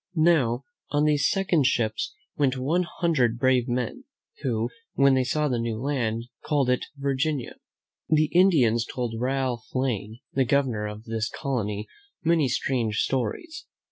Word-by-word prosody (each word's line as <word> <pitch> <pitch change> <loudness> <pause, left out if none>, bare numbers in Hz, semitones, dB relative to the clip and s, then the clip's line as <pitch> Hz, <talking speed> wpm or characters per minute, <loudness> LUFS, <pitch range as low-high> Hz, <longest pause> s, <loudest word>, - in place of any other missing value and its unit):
Now, 155 -7 +3 0.3
on 145 0 +1
these 145 -2 +3
second 180 -8 +2
ships 110 -5 -1 0.2
went 135 -3 +1
one 165 +7 0
hundred 130 -9 +2
brave 130 0 +3
men, 125 - -2 0.4
who, 120 -3 -1 0.2
when 140 0 +5
they 130 -1 +3
saw 150 +4 0
the 125 -4 0
new 115 -1 -2
land, 120 -4 -1 0.2
called 140 -4 +1
it 125 - 0
Virginia. 140 0 -1 0.5
The 155 -1 +3
Indians 145 - +4
told 120 0 -4
Ralph 130 -3 -1
Lane, 115 -4 -1
the 135 - +3
Governor 125 -5 +1
of 105 +1 -8
this 115 -1 -2
colony, 105 -6 -3 0.4
many 165 -3 +3
strange 120 -3 0
stories. 320 - -3
130 Hz, 140 wpm, -26 LUFS, 115-145 Hz, 0.5 s, when